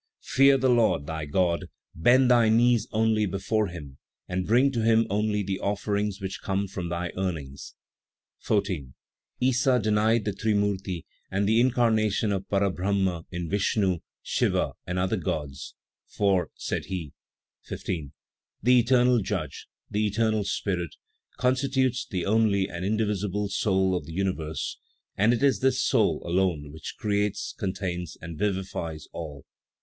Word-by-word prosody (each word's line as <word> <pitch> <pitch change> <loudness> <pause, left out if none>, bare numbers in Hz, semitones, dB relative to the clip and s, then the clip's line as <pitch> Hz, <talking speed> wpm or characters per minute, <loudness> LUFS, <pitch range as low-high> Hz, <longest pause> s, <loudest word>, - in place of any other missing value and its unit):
"Fear 135 +1 +5
the 130 0 +1
Lord, 115 - +3
thy 80 0 -4
God; 85 +2 0 0.2
bend 125 +8 +4
thy 120 -2 +5
knees 120 0 +4
only 110 -1 +2
before 100 +3 0
Him 75 -7 -9 0.3
and 90 0 -2
bring 125 +6 +4
to 120 -4 -1
Him 115 0 +4
only 105 0 +1
the 95 0 -3
offerings 100 0 -1
which 95 -1 -5
come 100 +1 -1
from 90 -2 -5
thy 85 0 -3
earnings." 80 -8 -4 0.6
14. 90 -11 -1 0.5
Issa 130 0 +3
denied 110 0 +2
the 105 - -1
Trimurti 100 -4 -1 0.2
and 100 +1 0
the 110 +2 +4
incarnation 115 -4 +2
of 95 -1 -3
Para 100 -1 +2
Brahma 95 -2 -1
in 85 -2 -4
Vishnu, 95 -1 +1 0.2
Siva, - - +1 0.2
and 90 - -2
other 95 +4 +1
gods; 75 -5 -4 0.3
"for," 95 -3 +1
said - - -3
he: 85 -6 -5 0.5
15. 75 -6 -4 0.5
"The 125 +2 +6
eternal 125 0 +4
Judge, 95 -8 -4 0.2
the 105 +1 0
eternal 110 0 +1
Spirit, 90 -5 -2 0.4
constitutes 130 0 +1
the 90 -4 -2
only 100 -2 +2
and 85 0 -6
indivisible 105 -1 -1
soul 95 -2 +1
of 90 - -4
the 80 - -8
universe, 80 -4 -2 0.4
and 110 +4 +4
it 120 +2 0
is 140 -2 +4
this 130 0 +2
soul 110 - +2
alone 85 -5 0
which 80 - -8
creates, 105 -1 -1
contains 95 -3 -4
and 85 0 -7
vivifies 95 -6 -2
all. 75 -5 -7
100 Hz, 145 wpm, -26 LUFS, 90-110 Hz, 0.6 s, The